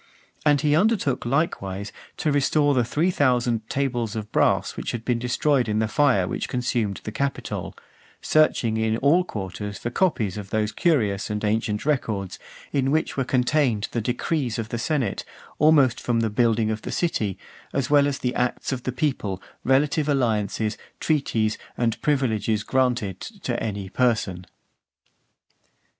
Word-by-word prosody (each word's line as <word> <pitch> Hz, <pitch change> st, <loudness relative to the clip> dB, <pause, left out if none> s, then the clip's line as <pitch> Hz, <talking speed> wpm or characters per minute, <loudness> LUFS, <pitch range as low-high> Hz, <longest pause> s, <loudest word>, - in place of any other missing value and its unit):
And 145 Hz, -2 st, +4 dB
he 150 Hz, -1 st, +3 dB
undertook, 175 Hz, -, +1 dB
likewise, 105 Hz, -, -1 dB, 0.3 s
to 155 Hz, -, 0 dB
restore 145 Hz, +1 st, +3 dB
the 125 Hz, -3 st, +3 dB
three 155 Hz, +10 st, +1 dB
thousand 120 Hz, -7 st, +1 dB
tables 120 Hz, -6 st, -1 dB
of 110 Hz, -1 st, -5 dB
brass -, -, +2 dB
which -, -, -4 dB
had 115 Hz, -1 st, -5 dB
been 120 Hz, -2 st, +1 dB
destroyed 125 Hz, +1 st, +1 dB
in 105 Hz, -, 0 dB
the 110 Hz, 0 st, +1 dB
fire 125 Hz, -7 st, +3 dB
which -, -, -3 dB
consumed 120 Hz, -5 st, -1 dB
the 110 Hz, -, -5 dB
Capitol; 140 Hz, +5 st, -3 dB, 0.4 s
searching 125 Hz, -7 st, +2 dB
in 110 Hz, 0 st, +1 dB
all 150 Hz, +8 st, +4 dB
quarters 100 Hz, -, -5 dB
for 120 Hz, -, -4 dB
copies 115 Hz, -, 0 dB
of 100 Hz, -2 st, -8 dB
those 110 Hz, 0 st, 0 dB
curious 110 Hz, -, +1 dB
and 105 Hz, 0 st, -3 dB
ancient 105 Hz, +1 st, 0 dB
records, 110 Hz, -10 st, -1 dB, 0.3 s
in 135 Hz, -1 st, +1 dB
which 155 Hz, +3 st, 0 dB
were 135 Hz, -, +1 dB
contained 125 Hz, -3 st, +1 dB
the 115 Hz, -, -1 dB
decrees 125 Hz, +2 st, -1 dB
of 110 Hz, -1 st, -4 dB
the 120 Hz, -, -3 dB
senate, 140 Hz, 0 st, -1 dB, 0.4 s
almost 145 Hz, -5 st, +4 dB
from 115 Hz, -2 st, +1 dB
the 110 Hz, -2 st, 0 dB
building 110 Hz, 0 st, +2 dB
of 110 Hz, 0 st, -3 dB
the -, -, -6 dB
city, 110 Hz, -, -1 dB, 0.3 s
as 135 Hz, +1 st, -1 dB
well 145 Hz, -1 st, +5 dB
as 140 Hz, -2 st, -1 dB
the 125 Hz, 0 st, -2 dB
acts 125 Hz, +2 st, -1 dB
of 130 Hz, -2 st, -2 dB
the 130 Hz, -, -2 dB
people, 125 Hz, -, -1 dB, 0.2 s
relative 140 Hz, +3 st, +2 dB
to 145 Hz, -, +3 dB
alliances, 110 Hz, -4 st, 0 dB, 0.2 s
treaties, 115 Hz, -8 st, 0 dB, 0.2 s
and 115 Hz, -2 st, 0 dB
privileges 110 Hz, -7 st, +1 dB
granted 120 Hz, -8 st, 0 dB
to 185 Hz, -, -5 dB
any 100 Hz, -3 st, -3 dB
person. 100 Hz, -5 st, 0 dB
120 Hz, 160 wpm, -24 LUFS, 110-140 Hz, 0.4 s, well